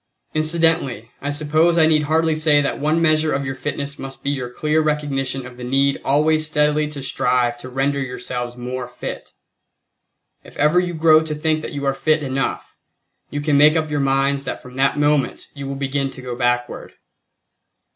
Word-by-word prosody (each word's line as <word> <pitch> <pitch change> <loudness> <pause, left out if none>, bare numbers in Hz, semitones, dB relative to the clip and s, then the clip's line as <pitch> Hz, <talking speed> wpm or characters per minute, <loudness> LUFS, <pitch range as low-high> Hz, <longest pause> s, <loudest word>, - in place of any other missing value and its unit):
Incidentally, 155 -7 0
I 145 - -3
suppose 155 +3 +2
I 160 - +6
need 155 -1 +4
hardly 160 +1 +2
say 155 -1 +3
that 140 - -1
one 155 +3 +1
measure 155 -1 +3
of 140 +1 -2
your 130 - -3
fitness 140 +1 -4
must 135 0 -8
be 140 - 0
your 130 -3 -3
clear 150 +5 0
recognition 135 -4 -1
of 125 -1 -11
the 125 - -8
need 135 +2 +1
always 155 +3 +2
steadily 150 0 +1
to 145 -2 -7
strive 125 -2 +1
to 130 - -9
render 135 +2 0
yourselves 125 -1 -5
more 125 0 -5
fit; 125 0 -8 1.1
if - - -15
you - - -14
ever 150 +5 +4
grow 160 -1 +5
to 160 -1 -4
think 155 +1 0
that - - -6
you 140 -1 -4
are 135 - +2
fit 155 +3 +1
enough, 135 0 -3 0.5
you 145 - -4
can 145 -1 +2
make 150 +2 +6
up 155 -1 -1
your 145 - 0
minds 140 0 +1
that - - -4
from 125 0 -13
that 135 +2 +2
moment 145 -1 0
you 140 -1 -7
will 140 - -4
begin 135 0 -1
to 130 -1 -9
go 125 -1 -5
backward. 120 0 -1
140 Hz, 190 wpm, -20 LUFS, 135-155 Hz, 1.1 s, I